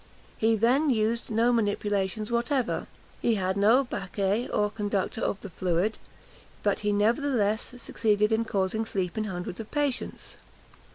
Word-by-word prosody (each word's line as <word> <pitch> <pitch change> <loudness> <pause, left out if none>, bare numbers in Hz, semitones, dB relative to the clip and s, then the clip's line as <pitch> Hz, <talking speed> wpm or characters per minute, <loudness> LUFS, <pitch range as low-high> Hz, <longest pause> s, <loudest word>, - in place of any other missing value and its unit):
He 225 0 +3 0.3
used 230 -1 +1
no 230 +2 +3
manipulations 205 -1 0
whatever 240 +1 0 0.4
had 190 -5 +1
no 220 +7 +5
baquet, 200 0 -1
or 210 0 +1
conductor 205 -1 -2
of 200 - -1
the 200 - -7
fluid; 180 +5 0 0.6
but - - +1
he 210 -1 0
nevertheless 220 +1 +1
succeeded 210 -3 +1
in 225 +1 +2
causing 200 +1 0
sleep 190 -5 -2
in 215 -1 -1
hundreds 180 -1 -5
of 220 - -7
patients. 290 -3 -2
215 Hz, 130 wpm, -27 LUFS, 200-230 Hz, 0.6 s, no